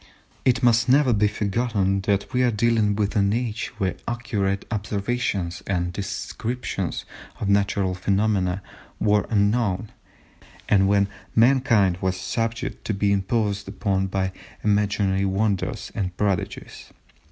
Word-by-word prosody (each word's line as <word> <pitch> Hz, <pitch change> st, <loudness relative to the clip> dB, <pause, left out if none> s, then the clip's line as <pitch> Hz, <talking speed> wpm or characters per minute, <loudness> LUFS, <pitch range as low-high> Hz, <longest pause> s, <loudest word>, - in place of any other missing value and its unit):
It 125 Hz, -2 st, +3 dB
must 115 Hz, 0 st, +4 dB
never 135 Hz, -1 st, +5 dB
be 105 Hz, 0 st, +3 dB
forgotten 100 Hz, -2 st, 0 dB
that 100 Hz, +5 st, 0 dB
we 125 Hz, -, +2 dB
are 125 Hz, -, +4 dB
dealing 110 Hz, -2 st, +2 dB
with 105 Hz, -1 st, -1 dB
an 100 Hz, -1 st, +3 dB
age 115 Hz, -2 st, -2 dB
when 95 Hz, -2 st, -1 dB
accurate 105 Hz, -5 st, -1 dB
observations 100 Hz, -3 st, -2 dB
and 90 Hz, -2 st, -1 dB
descriptions 100 Hz, +1 st, -4 dB, 0.3 s
of 100 Hz, -, -2 dB
natural 100 Hz, -1 st, +2 dB
phenomena 95 Hz, 0 st, 0 dB, 0.4 s
were 105 Hz, -1 st, +2 dB
unknown, 105 Hz, -1 st, +1 dB, 0.8 s
and 95 Hz, -1 st, +4 dB
when 100 Hz, 0 st, +3 dB, 0.3 s
mankind 115 Hz, -7 st, +4 dB
was 95 Hz, -1 st, -1 dB
subject 115 Hz, +6 st, -3 dB
to 105 Hz, -, -1 dB
be 100 Hz, 0 st, +1 dB
imposed 100 Hz, 0 st, 0 dB
upon 95 Hz, -1 st, -1 dB
by 95 Hz, 0 st, -1 dB, 0.3 s
imaginary 100 Hz, -2 st, +1 dB
wonders 100 Hz, 0 st, -1 dB
and 90 Hz, -2 st, -3 dB
prodigies. 100 Hz, -4 st, -3 dB
100 Hz, 125 wpm, -24 LUFS, 95-115 Hz, 0.8 s, never